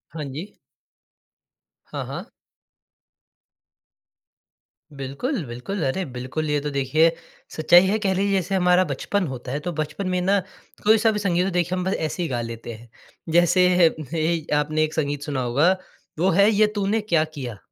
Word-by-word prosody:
हाँ 155 - -4
जी। 175 +10 -8 1.3
हाँ, - - -5
हाँ। - - -7 2.7
बिल्कुल, 145 - -3
बिल्कुल। 125 +10 -5
अरे 135 +8 -1
बिल्कुल। 130 +5 -3
ये 150 - +1
तो 150 - -3
देखिए 145 +4 +3 0.4
सच्चाई 175 +3 +6
है 200 +3 +1
कह 195 -2 +1
लीजिए 200 +2 0
जैसे 190 +1 -1
हमारा 180 0 +4
बचपन 185 +7 -1
होता 130 -2 -6
है 140 - -2
तो 175 +4 -4
बचपन 155 +6 -3
में 180 0 0
ना 195 +2 +3 0.4
कोई-सा 220 +1 +4
भी 210 - -2
संगीत 180 -2 +1
देखिए 175 0 0
हम 180 - -2
बस 190 - 0
ऐसे 160 +3 -3
ही 165 - -3
गा 120 -2 -1
लेते 115 0 -6
हैं। 115 +2 -14 0.4
जैसे 175 +2 +5 0.5
ए 165 0 0
आपने 155 +1 +1
एक 155 0 -2
संगीत 145 -2 -1
सुना 140 -3 -2
होगा 135 +8 +3 0.5
वो 185 +3 +3
है 200 +5 +5
ये 215 0 +4
तूने 205 +2 0
क्या 170 -7 +2
किया। 125 -7 -6
165 Hz, 165 wpm, -23 LUFS, 140-190 Hz, 2.7 s, सच्चाई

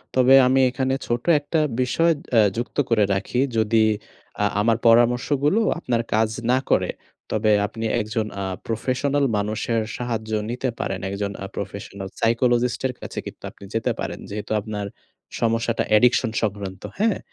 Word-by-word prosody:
তবে 130 0 +5
আমি 135 +1 +3
এখানে 130 +1 -1
ছোট 120 0 -1 0.2
একটা 150 +2 -1 0.2
বিষয় 165 +7 +2 0.2
অ্যা 115 - +6 0.2
যুক্ত 120 - -4
করে 115 -3 +3
রাখি। 100 +5 -2 0.2
যদি 110 +1 +2 0.7
আ - - +4 0.2
আমার 115 +1 +3
পরামর্শগুলো 125 - +3 0.2
আপনার 120 -7 0
কাজ 110 0 +3 0.2
না 130 - +4
করে, - - +2 0.4
তবে 110 0 +2 0.2
আপনি 115 +1 -6 0.2
একজন 110 +1 -2 0.2
আ - - -2 0.2
প্রফেশনাল 135 +5 0
মানুষের 110 +2 -1 0.2
সাহায্য 115 -3 -4 0.2
নিতে 125 +2 -2
পারেন। 95 0 -2
একজন 100 0 -3
আ - - -4
প্রফেশনাল 100 0 -6
সাইকোলজিস্ট 120 +1 +2
এর 125 - -5
কাছে - - -8
কিন্তু - - -10
আপনি - - -17
যেতে 115 - 0
পারেন। - - -4
যেহেতু 105 +1 -6
আপনার 105 -1 -4 0.6
সমস্যাটা 115 0 +1
অ্যাডিকশন 115 +2 +4
সংক্রান্ত। 100 -3 -3 0.2
হ্যাঁ? 220 -2 +2
115 Hz, 150 wpm, -23 LUFS, 105-125 Hz, 0.7 s, অ্যা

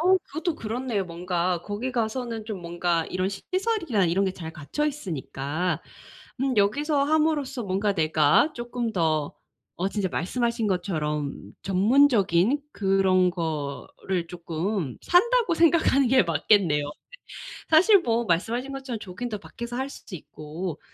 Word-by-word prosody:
어 370 +3 +5
그것도 325 +1 -3
그렇네요 225 -2 -2
뭔가. 175 0 -1
거기 225 +6 -4
가서는 230 -1 -2
좀 210 -4 -5
뭔가 170 -1 0
이런 185 +1 -1
시설이나 335 - -1
이런 190 +4 +2
게 190 - -1
잘 165 -4 -7
갖춰 170 - -2
있으니까 170 - -3 0.6
음 265 -3 0
여기서 280 +8 +2
함으로써 295 -4 +1
뭔가 200 +1 0
내가 155 - +3
조금 240 -1 -3
더 155 -4 0 0.4
어 185 +3 0
진짜 200 -2 -1
말씀하신 235 +4 -1
것처럼 150 - -2
전문적인 210 +2 +3
그런 190 -2 +3
거를 165 +2 -4
조금 170 - -3
산다고 450 +1 +3
생각하는 320 -5 +4
게 260 0 +5
맞겠네요. 160 -2 +2 0.8
사실 370 +6 +6
뭐 235 -4 +1
말씀하신 230 +10 0
것처럼 265 -4 -5
조깅도 210 +4 -5
밖에서 235 +3 -7
할 265 +2 -2
수 215 - -10
있고 155 +1 -7
200 Hz, 290 characters per minute, -25 LUFS, 170-260 Hz, 0.8 s, 사실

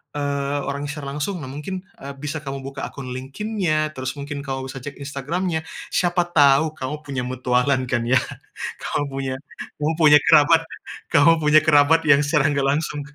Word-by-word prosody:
eee, 140 0 -1
orangnya 140 +1 -3
secara 140 -2 -6
langsung, 175 +5 -3
nah 130 - -7
mungkin, 185 +6 -6 0.2
eee, 140 +1 -7
bisa 150 +1 -4
kamu 135 -1 -6
buka 135 0 -5
akun 130 -2 -8
LinkedIn-nya, 155 - -2
terus 130 +2 -4
mungkin 140 0 -5
kamu 135 -1 -4
bisa 135 - -7
cek 145 - -7
Instagram-nya, 160 +4 -3 0.3
siapa 175 0 +2
tau 145 0 +5
kamu 150 +3 -5
punya 135 -2 -4
mutualan 130 +1 +1
kan 120 -2 +1
ya. 130 - +3 0.7
Kamu 145 - -1
punya 135 -1 -3 0.5
kamu 155 +2 +1
punya 150 -1 +8
kerabat 160 +1 +6 0.5
kamu 155 +3 +6
punya 150 +1 +6
kerabat 155 +2 +5
yang 145 -1 +6
secara 150 -1 +2
nggak 140 -1 0
langsung 145 +1 -1
145 Hz, 170 wpm, -22 LUFS, 135-155 Hz, 0.7 s, punya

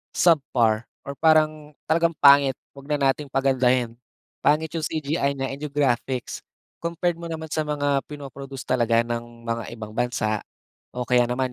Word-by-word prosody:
subpar 120 -9 +3 0.2
or 140 0 -6
parang 155 -1 +3 0.2
talagang 165 +1 +3
pangit, 140 -2 +6 0.2
huwag 140 0 -12
na 145 - +1
nating 145 +1 -7
pagandahin. 130 -3 +2 0.5
Pangit 155 +1 +2
'yong 160 - -2
CGI 150 -2 -1
niya 135 0 -2
and 140 - -7
'yong 150 - -4
graphics. 130 -3 -1 0.5
Compared 170 0 -1
mo 170 - -8
naman 160 -1 -5
sa 155 0 -1
mga 145 -2 0
pino-produce 140 -2 -8
talaga 115 -2 +2
ng 120 0 -3 0.2
mga 115 0 -1
ibang 110 -2 -8
bansa. 110 -2 -1 0.5
O 125 0 -4
kaya 125 -1 +4
naman, 125 0 -1
140 Hz, 155 wpm, -24 LUFS, 125-150 Hz, 0.5 s, pangit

